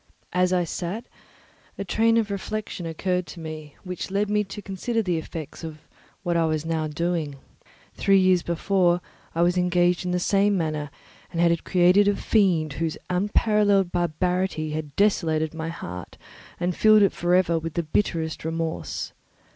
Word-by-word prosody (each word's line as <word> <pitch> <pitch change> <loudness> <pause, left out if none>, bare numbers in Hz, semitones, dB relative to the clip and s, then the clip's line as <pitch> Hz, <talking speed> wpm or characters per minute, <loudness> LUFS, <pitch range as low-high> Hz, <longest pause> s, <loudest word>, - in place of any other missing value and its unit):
As 180 0 +2
I 180 -1 +2
sat, 180 +7 -4 0.7
a - - -3
train 225 +5 +3
of 215 -3 +1
reflection 200 -3 -4
occurred 180 +2 -1
to 175 - -9
me 155 -2 -8
which 180 0 -5
led 200 +2 0
me 210 0 +2
to 195 - -8
consider 205 +4 -2
the 175 -4 0
effects 160 0 -8
of 160 -2 -6 0.5
what 175 -2 0
I 165 -1 +3
was 155 0 -1
now 160 -1 -1
doing. 160 -1 -2 0.6
Three 195 -1 +3
years 185 -2 +4
before, 175 +1 +2 0.4
I 170 - +3
was 175 +1 +2
engaged 180 0 +2
in 180 - -2
the 180 - +1
same 200 +2 +2
manner 155 -3 -2 0.4
and 170 - -4
had 170 -1 +3
created 185 +3 +4
a 205 - +3
fiend 175 -10 +2
whose 160 -2 -1
unparalleled 205 0 +2
barbarity 175 -1 0
had 150 -2 -5
desolated 160 -6 +2
my 160 0 -4
heart 90 - -7 0.4
and 175 0 -1
filled 215 -1 +6
it 195 - +3
for 175 +1 +1
ever 170 -3 +3
with 165 -1 -6
the 170 - 0
bitterest 160 -1 -1
remorse. 165 0 -3
175 Hz, 165 wpm, -25 LUFS, 160-195 Hz, 0.7 s, filled